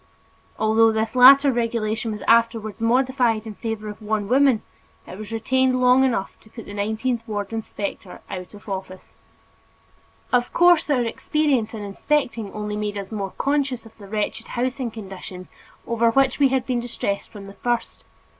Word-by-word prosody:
Although 225 +1 +4
this 220 +2 -1
latter 275 +3 +8
regulation 230 -2 -1
was 210 - -6
afterwards 230 -2 +2
modified 245 -2 +2
in 220 - -6
favor 220 0 -5
of 210 +1 -8
one 215 -1 -2
woman, 260 -1 +3 0.4
it - - -9
was 215 +2 -9
retained 255 +3 +1
long 250 +1 +5
enough 235 -7 -1
to 220 - -21
put 230 -1 -10
the 205 - -9
nineteenth 220 +4 -1
ward 205 -1 -4
inspector 205 -4 -5
out 185 +2 -7
of 205 - -15
office. 190 -1 -7 1.2
Of 245 0 +2
course 350 -3 +5
our 260 -4 +2
experience 250 -2 0
in 210 - -6
inspecting 230 0 -1
only 210 0 -4
made 210 -1 -3
us 200 +1 -6
more 200 -3 -4
conscious 275 -4 0
of 225 - -15
the 200 - -11
wretched 215 +2 -3
housing 255 +1 -2
conditions 190 -4 -9 0.3
over 235 0 +2
which 265 +3 +2
we 280 - +6
had 260 -1 0
been 250 -2 -1
distressed 235 -4 -3
from 205 -3 -10
the 195 - -10
first. 240 +3 -3
225 Hz, 165 wpm, -23 LUFS, 210-255 Hz, 1.2 s, latter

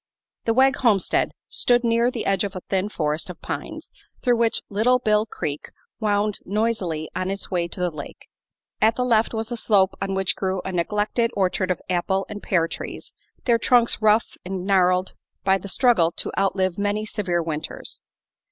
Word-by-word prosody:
The 225 - +1
Wegg 270 +2 +4
homestead 215 -7 +2 0.2
stood 245 0 +2
near 235 +1 +3
the 245 -3 -4
edge 195 -1 +2
of 200 -1 -4
a 185 - -5
thin 195 +2 -1
forest 155 -3 -2
of 180 - -8
pines - - -6 0.3
through 245 -2 +3
which 230 -1 +1
Little 225 +5 +3
Bill 215 -2 +2
Creek 150 -7 -5 0.3
wound 210 -1 +1
noisily 195 -7 -1
on 185 - -1
its 195 +1 -5
way 175 -2 0
to 170 - -7
the 180 -1 0
lake. 150 -2 -9 0.5
At 220 +1 +4
the 250 - 0
left 225 -2 +3
was 220 +1 -3
a 240 - -2
slope 195 -4 +3
on 195 0 -1
which 190 -1 0
grew 190 -1 -1
a 190 - -3
neglected 210 +6 0
orchard 190 -1 +1
of 185 - -1
apple 190 +2 0
and 210 -1 -6
pear 170 -3 +1
trees, - - -7 0.3
their 235 -2 +3
trunks 235 -1 +3
rough 215 +1 +3
and 185 0 -4
gnarled 185 -1 +2 0.3
by 195 0 +3
the 200 - -8
struggle 200 -7 +3
to - - -3
outlive 190 -1 0
many 205 +1 0
severe 185 -6 -1
winters. 155 -1 -5
200 Hz, 180 wpm, -23 LUFS, 185-225 Hz, 0.5 s, Wegg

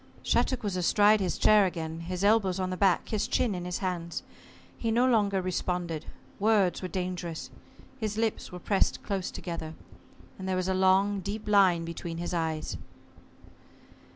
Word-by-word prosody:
Shattuck 255 -3 +1
was 200 -3 -2
astride 205 +4 +4
his 185 -3 -1
chair 210 -2 +5
again, 165 -2 -5
his 180 +2 -4
elbows 200 -3 +3
on 185 0 -1
the - - -2
back, 190 -1 +2
his 215 -2 -1
chin 235 -5 +1
in 175 -1 -5
his 180 0 -2
hands. 170 -2 -3 0.5
He 230 - -2
no 235 +3 +3
longer 205 -6 +2
responded. 175 -3 -2 0.3
Words 200 -4 +2
were 185 - -3
dangerous. 180 -2 -4 0.5
His 215 -2 -3
lips 225 -1 -1
were 180 - -7
pressed 195 +2 0
close 195 -2 -2
together, 160 -2 -6 0.6
and 190 0 -4
there 185 - +1
was 185 0 -1
a 190 - +1
long 190 +2 +3
deep 205 +3 -5
line 190 -5 +4
between 165 0 -6
his 175 +1 -4
eyes. 160 -2 -2
185 Hz, 165 wpm, -28 LUFS, 175-205 Hz, 0.6 s, chair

